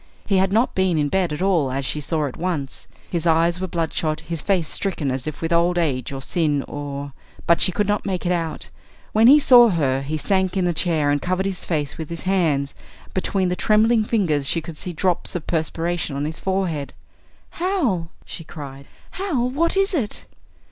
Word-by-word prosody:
He 195 - +2
had 190 0 +2
not 225 +5 +2
been 190 -3 +1
in 145 -1 +1
bed 185 -2 +1
at 150 +4 -2
all, 170 -9 +2
as 135 +1 -2
she 150 - -2
saw 155 +1 -1
at 135 - -5
once. 160 -6 -4 0.2
His 170 -1 -1
eyes 165 +2 +2
were 185 - -1
bloodshot, 160 -2 -1
his 165 -1 -5
face 180 -4 +1
stricken 165 -8 -1
as 130 +1 -3
if 155 +1 -5
with 165 +1 0
old 170 +1 +3
age 140 -8 0
or 135 -1 -6
sin 150 -2 0
or 140 -1 -6 0.3
but 170 - +3
she - - +4
could 205 +2 0
not 210 0 0
make 190 -2 -3
it 175 - +1
out. 165 - -2 0.4
When 220 +2 +5
he 280 +4 +9
saw 245 -5 +7
her 135 -7 +1
he 150 +3 -3
sank 190 +3 0
in 185 - +1
a 175 - +1
chair 155 -3 +1
and 145 -1 0
covered 185 +1 -1
his 195 -2 -3
face 150 -3 -2
with 160 - -5
his 170 0 -6
hands, 160 -8 +1 0.3
and - - -22
between 185 0 0
the 180 - 0
trembling 220 +3 +3
fingers 170 -11 +1
she 165 - +1
could 165 0 -8
see 180 - -6
drops 180 +1 -1
of 170 - -3
perspiration 165 -1 -1
on 140 +1 -2
his 160 +1 -4
forehead. 185 -7 -2 0.7
"Hal!" 275 - 0 0.2
she 165 - -7
cried, 140 -4 -9 0.2
"Hal, 285 -11 -1
what 335 +7 +1
is 390 0 +2
it?" 245 -11 -2
170 Hz, 210 wpm, -22 LUFS, 150-190 Hz, 0.7 s, he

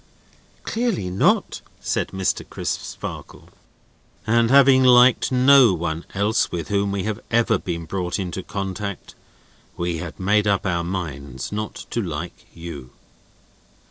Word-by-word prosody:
"Clearly 220 - -2
not," 95 - +1 0.2
said - - -1
Mr. 95 -1 -2
Crisparkle. - - -6 0.8
"And 115 +1 +3
having 135 -1 +6
liked 125 0 +5
no 130 -4 +6
one 85 0 -4
else 105 +3 +1
with 85 -3 -4
whom 100 0 0
we 100 -1 -2
have 110 -1 -3
ever 115 -3 +2
been 85 -2 -5
brought 90 +1 -3
into 95 -1 -4
contact, 100 +1 -5 0.6
we 85 -1 -2
had 85 0 -7
made 105 +2 +2
up 100 -2 +1
our 85 -3 0
minds 70 -8 -5
not 105 +1 -5
to 120 - -1
like 85 -3 -6
you." 80 -6 -8
95 Hz, 130 wpm, -22 LUFS, 85-110 Hz, 0.8 s, having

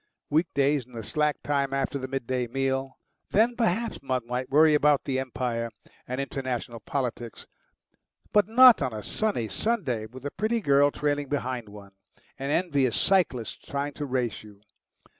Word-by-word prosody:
Week 160 +4 +3
davs, 140 -2 +2
in 125 - -20
the 115 -1 -6
slack 150 +7 0
time 140 -2 0
after 135 +1 -1
the 130 - -4
midday 130 -2 -2
meal, 135 +1 -2 0.3
then 230 +4 +3
perhaps 230 0 0
one 130 -3 -2
might 125 +2 -3
worry 155 +2 +5
about 150 -1 +4
the 130 -1 -1
Empire 120 -3 -2 0.4
and 125 +1 -3
international 130 -3 -4
politics; 120 -1 -4 0.9
but 210 -2 +4
not 250 +2 +8
on 130 -4 -1
a 105 -1 -6
sunny 205 - -1
Sunday, 125 - -1
with 130 +4 -12
a 145 - -3
pretty 220 +4 0
girl 140 -6 +4
trailing 145 -1 -2
behind 125 -5 -3
one, 100 -1 -12 0.5
and 135 +1 -2
envious 145 -8 +1
cyclists 165 - +1
trying 145 +1 -4
to 145 0 -5
race 125 -4 -1
you. 105 -1 -16
135 Hz, 160 wpm, -27 LUFS, 125-150 Hz, 0.9 s, not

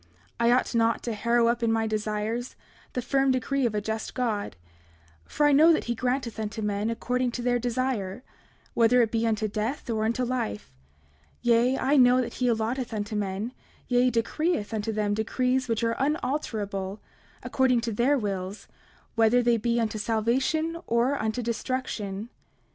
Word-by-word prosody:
29:4 85 - -31 0.3
I 235 0 +4
ought 255 - +1
not 230 0 +2
to 235 - -2
harrow 235 +2 +2
up 235 +1 +1
in 230 -1 +2
my 225 0 +1
desires, 215 +2 -2 0.4
the 250 - -2
firm 270 +2 +2
decree 260 0 +1
of 215 - -4
a 210 - 0
just 220 +1 -4
God, 220 - -2 0.7
for 295 - 0
I 295 - +5
know 310 +4 +7
that 320 - +2
he 235 - -1
granteth 250 -1 -2
unto 215 0 -4
men 205 +1 -1
according 250 +2 -1
to 245 - -4
their 245 0 +2
desire, 245 -4 -2 0.5
whether 240 +1 +4
it 220 - -1
be 230 0 +1
unto 215 -1 0
death 215 +8 -3
or 220 -1 0
unto 235 +3 0
life; 105 - -3 0.7
yea, 240 +2 +3
I 280 +3 +2
know 250 -1 +6
that 250 - -2
he 250 - +3
allotteth 235 +2 -1
unto 210 +1 -3
men, 205 +3 -2 0.4
yea, 250 0 +3
decreeth 235 +1 -1
unto 220 0 -2
them 210 -1 0
decrees 255 +4 0
which 230 0 -1
are 230 0 +1
unalterable, 220 -9 -2 0.4
according 255 -3 +2
to 230 0 -2
their 245 +7 +2
wills, 195 -3 -4 0.5
whether 230 +2 +4
they 235 -1 +3
be 235 +1 0
unto 220 -2 -1
salvation 260 +10 0
or 235 +4 +2
unto 220 +3 -2
destruction. 230 -3 -3
235 Hz, 170 wpm, -27 LUFS, 215-250 Hz, 0.7 s, know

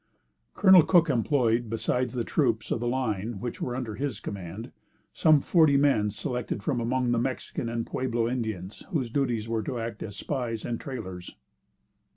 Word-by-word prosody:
Col. 190 -3 +8
Cook 170 -1 +4
employed, 120 -2 +1
besides 115 +3 -1
the 120 - 0
troops 115 -5 0
of - - +1
the 120 - -2
line 115 -4 -2
which 120 +2 -5
were 125 - -2
under 125 -4 -4
his 130 -1 -3
command, 100 +2 -7 0.4
some 155 -3 +5
forty 155 -4 +4
men 135 -7 +3
selected 110 0 -4
from 120 +1 0
among 125 +1 0
the 120 - +2
Mexican 120 -1 -3
and 115 0 -2
Pueblo 120 -3 -1
Indians, 110 -6 -4
whose 130 -8 -1
duties 120 -5 0
were 115 -1 -1
to 125 +1 -4
act 115 -2 -5
as 105 -2 -6
spies 120 -3 -3
and 115 -1 -3
trailers. 95 -10 -7
120 Hz, 170 wpm, -27 LUFS, 110-130 Hz, 0.4 s, Col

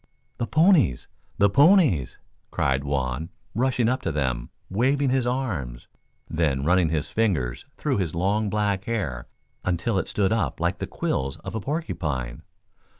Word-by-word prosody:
"The 115 - -1
ponies! 160 - +4 0.3
The 100 - +5
ponies!" 140 - +4 0.3
cried 65 0 0
Juan, 70 +2 -2 0.2
rushing 125 0 +1
up 130 +2 +1
to 85 - -2
them, 65 -5 -1 0.2
waving 130 +7 +1
his 130 -2 +1
arms, 90 - -3 0.4
then 75 -5 0
running 90 0 +3
his 80 -1 -2
fingers 85 - 0
through 140 -6 0
his 85 -5 -2
long 100 +4 +1
black 100 -2 0
hair 80 - -3 0.4
until 90 +4 0
it - - -3
stood 100 -1 +1
up 95 - 0
like - - 0
the - - -3
quills 65 0 -2
of - - -7
a 110 - -3
porcupine. 75 - -3
95 Hz, 150 wpm, -25 LUFS, -, 0.4 s, The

